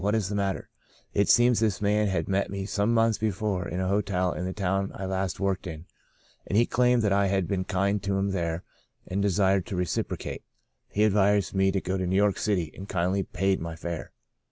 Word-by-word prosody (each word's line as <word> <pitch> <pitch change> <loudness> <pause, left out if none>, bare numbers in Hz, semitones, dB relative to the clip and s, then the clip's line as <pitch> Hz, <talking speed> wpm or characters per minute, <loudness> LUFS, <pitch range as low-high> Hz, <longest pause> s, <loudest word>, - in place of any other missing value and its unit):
What 105 +2 +1
is 105 -4 0
the 105 - -2
matter? 100 -1 -1 0.3
' - - -33
It 100 - +1
seems 120 -1 +5
this 110 -4 +1
man 105 +1 +2
had 90 -5 -1
met 95 0 0
me 100 0 -4
some 105 +2 0
months 115 -1 +3
before 105 -3 -1
in 90 - -3
a 95 - 0
hotel 95 -2 0
in 90 - -4
the 95 - -2
town 95 0 -1
I 95 - -5
last 95 -1 -2
worked 100 -1 -1
in, 80 0 -7 0.6
and 100 - 0
he 120 - +5
claimed 125 -1 +2
that 100 -2 +2
I 100 0 +3
had 95 -2 0
been 95 0 -1
kind 100 +2 0
to 100 0 -1
him 100 0 0
there 85 -2 -2 0.4
and 95 +2 -2
desired 95 -2 +2
to 100 - -4
reciprocate. 90 -2 -3 0.5
He 105 - +1
advised 100 -1 +3
me 95 0 +3
to 95 - 0
go 95 +1 -2
to 90 - -1
New 95 - 0
York 100 0 +2
City, 90 -7 0
and 95 +1 -9
kindly 95 +2 0
paid 95 +1 0
my 85 0 -5
fare. 85 0 -5
95 Hz, 225 wpm, -27 LUFS, 95-100 Hz, 0.6 s, seems